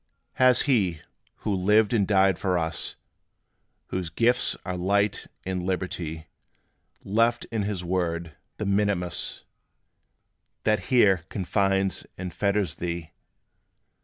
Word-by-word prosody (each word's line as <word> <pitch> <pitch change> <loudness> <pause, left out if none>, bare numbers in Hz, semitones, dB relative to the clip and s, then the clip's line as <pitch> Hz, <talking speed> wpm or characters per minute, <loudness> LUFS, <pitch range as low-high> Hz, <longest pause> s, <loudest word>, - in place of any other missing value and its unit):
Has 130 -1 +5
He, 100 - +2 0.5
who 105 - +1
lived 105 +4 +3
and 100 -5 +2
died 95 -3 +3
for 90 -2 +1
us 80 -2 -3 0.9
Whose 90 -3 -3
gifts 120 +8 +2
are 90 - -2
light 100 +3 +1 0.2
and 95 -1 -2
liberty, 90 -4 -3 0.8
Left 115 +4 +2
in 110 -2 0
his 100 -3 -2
Word 85 -3 -2 0.2
the 105 - -3
mitimus 100 -3 0 1.2
That 110 0 +1
here 100 -9 +4
confines 95 0 0
and 90 -1 -5
fetters 100 -5 0
thee? 85 -2 -4
95 Hz, 110 wpm, -26 LUFS, 90-105 Hz, 1.2 s, Has